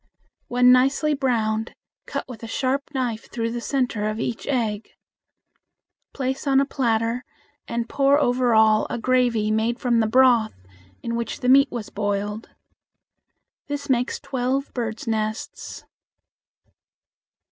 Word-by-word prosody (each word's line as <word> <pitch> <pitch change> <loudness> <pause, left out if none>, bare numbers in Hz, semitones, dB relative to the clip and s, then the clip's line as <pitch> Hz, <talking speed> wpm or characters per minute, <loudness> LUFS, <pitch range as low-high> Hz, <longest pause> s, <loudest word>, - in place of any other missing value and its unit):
When 250 +1 +5
nicely 270 +4 +3
browned, 225 -5 -1 0.3
cut - - -4
with 245 -4 -10
a 230 - -7
sharp 260 +4 0
knife 240 -4 -2
through 230 -1 -3
the 240 0 -4
center 245 -6 -1
of 215 +1 -4
each 230 0 -4
egg. 225 -6 -1 1.2
Place 265 +1 -3
on 270 -1 +4
a 275 - +3
platter, 235 -3 0 0.4
and 235 0 -2
pour 280 +1 +3
over 245 -3 +2
all 220 -1 +4
a - - -3
gravy 240 -3 +1
made 225 +2 0
from 240 -2 +1
the 220 - +2
broth 240 -2 +4 0.5
in 235 - -2
which 235 -1 -4
the 250 - +1
meat 275 +1 +6
was 230 -4 -6
boiled. 205 +1 -3 1.2
This 285 -1 -3
makes 250 0 0
twelve 265 +1 -2
birds' 230 -2 -4
nests. 220 -1 -4
240 Hz, 135 wpm, -23 LUFS, 220-260 Hz, 1.2 s, meat